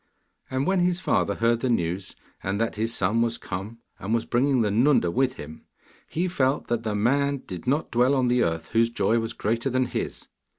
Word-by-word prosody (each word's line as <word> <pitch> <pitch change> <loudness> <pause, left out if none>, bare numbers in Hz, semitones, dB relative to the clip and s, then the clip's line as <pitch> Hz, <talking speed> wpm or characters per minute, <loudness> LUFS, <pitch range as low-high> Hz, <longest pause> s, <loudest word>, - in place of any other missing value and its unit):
And 130 +1 -1
when 190 +1 +2
his 180 0 +1
father 100 - +1
heard 115 0 +2
the 130 - -1
news, 90 -4 -1 0.3
and 95 +2 -2
that 115 0 0
his 110 +2 -1
son 110 +1 +1
was 115 0 +1
come, 100 +5 -6 0.2
and 105 +4 -1
was 115 - -1
bringing 130 +1 +2
the 105 - 0
Nunda 120 -5 +3
with 130 +5 +1
him, 75 +2 -10 0.4
he 175 +3 -1
felt 135 -6 0
that 120 -1 0
the 110 -2 -2
man 140 +5 +1
did 90 +4 -8
not 145 +5 0
dwell 125 +3 +3
on 130 -2 +2
the 120 0 +2
earth 80 -1 -2
whose 115 +1 +3
joy 115 0 +1
was 115 0 -3
greater 115 +5 -1
than 130 0 +1
his. - - -5
115 Hz, 210 wpm, -25 LUFS, 105-130 Hz, 0.4 s, Nunda